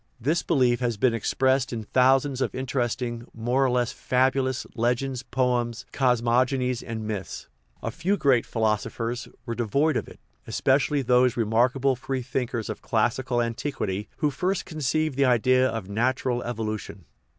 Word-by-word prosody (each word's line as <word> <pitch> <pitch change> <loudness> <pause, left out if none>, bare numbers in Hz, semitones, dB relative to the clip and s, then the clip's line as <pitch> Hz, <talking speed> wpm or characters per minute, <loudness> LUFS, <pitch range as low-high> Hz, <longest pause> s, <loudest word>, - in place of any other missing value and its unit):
This 155 +8 +1
belief 125 -7 +2
has 120 -3 -1
been 120 +3 +3
expressed 130 +3 +1
in 115 -2 -4
thousands 130 +3 +2
of - - -1
inter 130 +1 -2
esting, 120 0 -2
more 120 +4 +1
or 135 - +3
less 125 -1 +1
fabulous, 130 0 0
legends, 125 +2 -1
poems, 120 -2 -1
cosmog 125 -1 +3
onies, 125 -2 -1
and 110 -1 -5
myths. 105 -3 -5 0.4
A 115 - -2
few 180 - 0
great 135 -8 +3
philosophers 115 +2 -1 0.2
were 115 - -3
de 120 - -2
void 140 +7 +2
of - - -2
it, - - -13 0.3
especially 140 +1 +1
those 125 0 +3
remarkable 125 +4 +2
free 130 +1 -4
thinkers 120 -2 -3
of - - -5
classical 120 +2 0
antiquity 115 -4 -3
who 150 -3 +1
first 185 +6 -1
conceived 155 -1 -1
the 140 - +4
idea 130 +1 +4
of 110 -5 -4
nat 120 +6 0
ural 125 -2 0
evolution. 110 -5 -4
125 Hz, 160 wpm, -25 LUFS, 115-130 Hz, 0.4 s, the